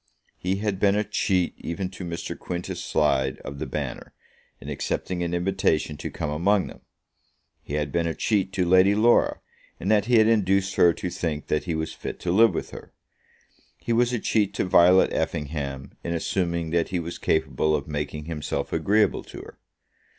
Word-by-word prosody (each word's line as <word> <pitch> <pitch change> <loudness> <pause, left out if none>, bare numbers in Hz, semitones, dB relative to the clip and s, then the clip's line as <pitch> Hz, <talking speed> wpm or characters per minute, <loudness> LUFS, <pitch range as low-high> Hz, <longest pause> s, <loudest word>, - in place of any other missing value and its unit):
He 90 +1 -1
had 100 -1 -2
been 100 0 +3
a 105 - +2
cheat 95 -3 0
even 90 +3 -3
to 95 - -8
Mr. 85 -1 -5
Quintus 90 -1 -5
Slide 65 -3 +1
of 70 0 -7
the 80 - -3
Banner, 70 -5 -5 0.4
in - - -11
accepting 90 -1 -3
an 85 0 -1
invitation 85 -4 0
to - - -5
come 75 - -4
among 95 +6 +2
them. - - -11 0.8
He 70 - -5
had 75 -2 -1
been 85 +1 0
a 80 - -2
cheat 100 -1 0
to 95 -2 +1
Lady 95 +3 +5
Laura, 115 +3 +3 0.4
in 95 - -3
that 105 -2 +3
he 120 +1 +3
had 110 - +6
induced 100 -3 +2
her 85 - +5
to 90 +1 -5
think 75 -4 -3
that 75 - 0
he 85 -3 -2
was 80 0 -3
fit - - -7
to 85 - -1
live 115 +5 +5
with - - -4
her. - - -10 0.9
He 120 - -2
was 120 +1 +3
a 125 - 0
cheat 105 -2 0
to - - 0
Violet 90 +1 +5
Effingham, 70 -2 -3
in 85 0 -2
assuming 85 -1 -1
that 85 -1 +1
he 90 - -1
was 85 +1 -6
capable 75 0 +1
of 70 - -3
making 75 0 -4
himself 80 -2 -4
agreeable 105 +1 +2
to - - -9
her. - - -14
85 Hz, 190 wpm, -25 LUFS, 80-100 Hz, 0.9 s, had